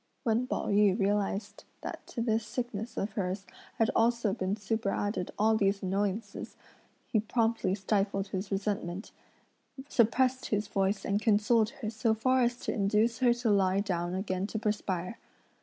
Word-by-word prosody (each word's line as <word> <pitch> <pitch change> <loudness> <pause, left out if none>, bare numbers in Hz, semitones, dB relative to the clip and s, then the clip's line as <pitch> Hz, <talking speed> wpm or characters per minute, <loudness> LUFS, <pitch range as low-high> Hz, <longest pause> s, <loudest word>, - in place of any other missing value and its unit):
When 235 0 +1
Pao - - -2
yü 205 -1 +4
realised 200 0 -1 0.2
that - - -7
to 235 - -4
this 225 -1 +1
sickness 235 -1 -4
of 200 - -1
hers, 195 0 -3 0.3
had 225 - +3
also 230 -2 +2
been 190 +1 -1
superadded 205 -2 -1
all 220 +1 +4
these 195 -2 +1
annoyances, 200 +2 -2 0.5
he 220 - +1
promptly 225 -3 +1
stifled 195 0 0
his 195 0 -4
resentment, 195 -1 -2 0.8
suppressed 255 +1 +2
his 210 -1 0
voice 195 0 0
and 200 +1 +1
consoled 215 +1 +3
her 215 - -1
so 220 0 +1
far 255 +3 +2
as 240 0 +2
to - - -2
induce 215 +3 +2
her 250 -2 +5
to 240 -2 +1
lie 195 -1 +3
down 180 -3 -1
again 190 0 -2
to 220 - -4
perspire. 205 -3 -2
210 Hz, 155 wpm, -30 LUFS, 195-225 Hz, 0.8 s, her